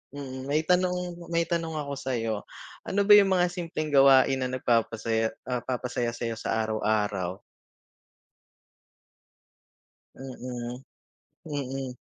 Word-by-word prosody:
Mm, 130 -2 -7
may 150 +3 +1
tanong 180 -1 0
may 170 0 +1
tanong 165 -2 -2
ako 140 -2 -4
sa'yo. 115 -4 -1 0.5
Ano 200 +1 +1
ba 205 - +2
yung 195 -2 +3
mga 180 0 +2
simpleng 165 -4 -4
gawain 135 -1 +6
na 130 - -1
nagpapasaya 115 -2 0
ah, 125 -1 -2
papasaya 120 -1 -3
sa'yo 115 -2 -4
sa - - -1
araw-araw? 105 -4 -1 2.8
Mm, 125 -1 -6 0.7
mm. 135 -3 -4
130 Hz, 110 wpm, -27 LUFS, 115-160 Hz, 2.8 s, gawain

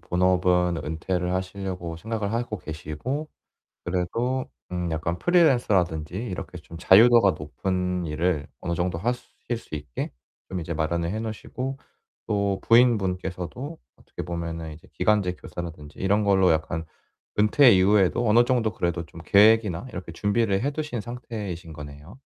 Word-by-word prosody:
본업은 90 -1 +2
은퇴를 90 +3 -2
하시려고 95 -3 -4
생각을 110 +2 -3
하고 115 -3 -2
계시고 80 - -5 0.6
그래도 115 +9 -1 0.2
음 90 -1 -2
약간 85 +2 -2
프리랜서라든지 100 - +2
이렇게 95 -4 -5
좀 85 0 -11
자유도가 110 0 +7
높은 90 +3 -2
일을 75 -1 0
어느 85 - -2
정도 85 0 -1
하실 120 +2 -3
수 95 - -9
있게 75 -4 -5 0.4
좀 95 -1 -3
이제 85 +1 -4
마련을 85 +2 -1
해 110 - -2
놓으시고 125 +4 -5 0.5
또 100 -2 0
부인분께서도 105 - +1 0.2
어떻게 - - -9
보면은 85 -2 -4
이제 80 - -16
기간제 105 -4 +2
교사라든지 80 -5 -8
이런 100 +3 +2
걸로 95 -3 +4
약간 80 +1 -1 0.5
은퇴 115 +5 +6
이후에도 100 +4 +4
어느 115 +3 +6
정도 120 -4 +1
그래도 85 -2 -2
좀 85 +1 -12
계획이나 105 -2 +4
이렇게 90 -2 -7
준비를 105 +2 +1
해 140 - +1
두신 150 -5 -3
상태이신 105 -7 -6
거네요. 75 - -10
95 Hz, 340 characters per minute, -25 LUFS, 85-110 Hz, 0.6 s, 자유도가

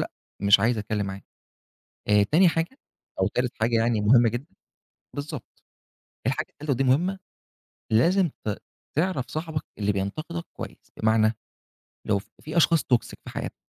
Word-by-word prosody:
لأ، - - -25 0.3
مش 100 0 +7
عايز 115 +1 +2
أتكلم 105 -1 -1
معاك. 95 0 -6 0.8
آآ، 105 0 +6
تاني 165 - +5
حاجة 165 - -1 0.4
أو - - +3
تالت 125 0 -1
حاجة 115 +1 +3
يعني 115 -1 +2
مُهمّة 115 +3 +6
جدًا 120 +8 -5 0.6
بالضبط، 145 +1 -7 0.6
الحاجة - - 0
التالتة 150 -1 -4
ودي 135 +1 +2
مهمّة، 170 +9 +2 0.7
لازم 170 - +4 0.2
ت 105 - 0 0.4
تعرف 165 -6 +1
صاحبك 155 -1 -3 0.2
اللي 105 0 +2
بينتقدك 155 - -3
كويس، - - -9
بمعنى، 110 0 +3 0.7
لو 100 -2 +3 0.2
في 155 +2 -6
أشخاص 165 -1 +5
toxic 125 -3 +1
في - - -8
حياتنا، - - -5
125 Hz, 145 wpm, -26 LUFS, 110-160 Hz, 0.8 s, مش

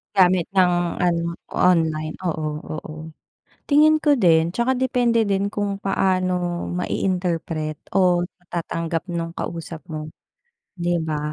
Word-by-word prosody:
Gamit 185 -2 +4
ng, 180 -2 +4 0.3
ano, 170 -1 +1 0.2
online, 160 -3 +2
oo, 155 -3 -2 0.2
oo. 155 +1 -8 0.6
Tingin 310 +2 +5
ko 295 -1 +3
din, 170 -6 +3
'tsaka 250 +2 +1
depende 240 -3 +2
din 200 0 0
kung 205 -1 -2
paano 185 -2 0
mai-interpret 170 -4 -2 0.2
o 180 -2 +4 0.2
matatanggap 170 0 -4
no'ng 165 0 -3
kausap 165 -1 -6
mo, 155 -1 -5 0.7
'di 175 0 0
ba, 150 -1 -2
175 Hz, 115 wpm, -22 LUFS, 160-195 Hz, 0.7 s, Tingin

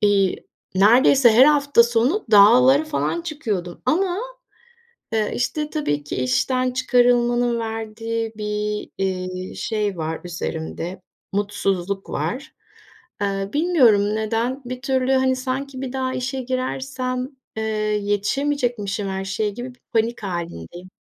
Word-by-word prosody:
iii, 200 -2 +2 0.3
neredeyse 240 +5 +6
her 245 +4 +7
hafta 285 -4 +5
sonu 240 - +1
dağlara 250 +8 +7
falan 310 +2 -1
çıkıyordum 215 - -4
ama, 355 +6 +1 1.0
eee, 215 -1 +1
işte, 300 +4 -1
tabii 145 - -2
ki 145 - -5
işten 250 - +1
çıkarılmanın 245 -1 +2
verdiği 225 0 -4
bir, 210 0 -3 0.2
eee, 185 0 -4
şey 210 -4 -2
var 160 0 -3
üzerimde, 175 +1 -5 0.3
mutsuzluk 195 -1 -1
var. 280 +5 -4 0.7
Eee, 195 -1 -1
bilmiyorum 240 - +4
neden? 230 +5 -1
Bir 250 0 -6
türlü, 265 -1 0
hani, 260 0 +3
sanki 260 +1 -4
bir 265 -1 -5
daha 260 -1 -2
işe 260 +1 -3
girersem, 255 0 -3 0.3
eee, 220 - -1 0.4
yetişemeyecekmişim 210 -1 -1
her 190 0 -3
şeye 210 +2 -1
gibi 245 +5 -7
bir - - -35
panik 230 0 0
hâlindeyim. 175 - -6
230 Hz, 120 wpm, -22 LUFS, 200-260 Hz, 1.0 s, her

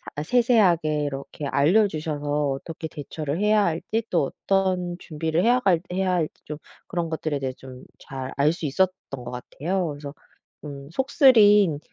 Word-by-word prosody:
아 150 - -3
세세하게 180 -9 +3
이렇게 140 +1 -5
알려 175 +12 +4
주셔서 150 -2 -2
어떻게 160 +4 -6
대처를 150 +1 -5
해야 210 0 +3
할지 175 +7 -2
또 155 -6 +1
어떤 185 -2 +1
준비를 160 +2 -2
해야 245 +2 +4
갈 180 -8 +2
해야 185 0 0
할지 165 -4 -1
좀 150 0 -6 0.3
그런 170 -3 -2
것들에 155 -2 -2
대해 135 -1 -2
좀 130 -1 -12 0.2
잘 130 -1 -7
알 150 +3 +3
수 170 - -6
있었던 185 +6 +1 0.2
것 125 -2 -6
같아요. 170 +9 -3
그래서 145 -1 -7 0.5
음 140 -2 -8
속쓰린 210 - +5
160 Hz, 310 characters per minute, -24 LUFS, 145-190 Hz, 0.5 s, 속쓰린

